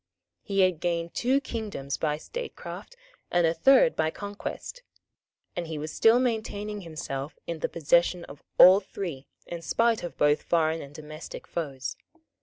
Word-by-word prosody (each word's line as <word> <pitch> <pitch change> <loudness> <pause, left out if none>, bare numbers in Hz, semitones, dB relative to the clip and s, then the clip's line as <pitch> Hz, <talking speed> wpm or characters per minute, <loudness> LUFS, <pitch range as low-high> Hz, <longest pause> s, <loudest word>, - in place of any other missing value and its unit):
He 195 -1 0
had 185 -4 +3
gained 170 -1 -1
two 260 +3 +2
kingdoms 210 - -4
by 150 -2 -1
statecraft, - - -7 0.3
and 175 -1 +3
a 165 - +3
third 275 - +5
by 160 - +1
conquest; 205 - -6 0.7
and 175 -1 -3
he 160 -1 -4
was 155 +1 -5
still 225 +1 +5
maintaining 215 -4 -2
himself 150 -4 -5
in 170 -1 -4
the - - -1
possession 170 +2 +2
of 140 - -12 0.2
all 185 +2 +9
three 175 -8 -6 0.2
in 170 -1 -6
spite 230 +6 +2
of 175 - -6
both 150 0 +3
foreign 160 -1 +1
and 140 +1 -11
domestic 155 +1 -9
foes. 140 -5 -4
170 Hz, 155 wpm, -27 LUFS, 155-210 Hz, 0.7 s, all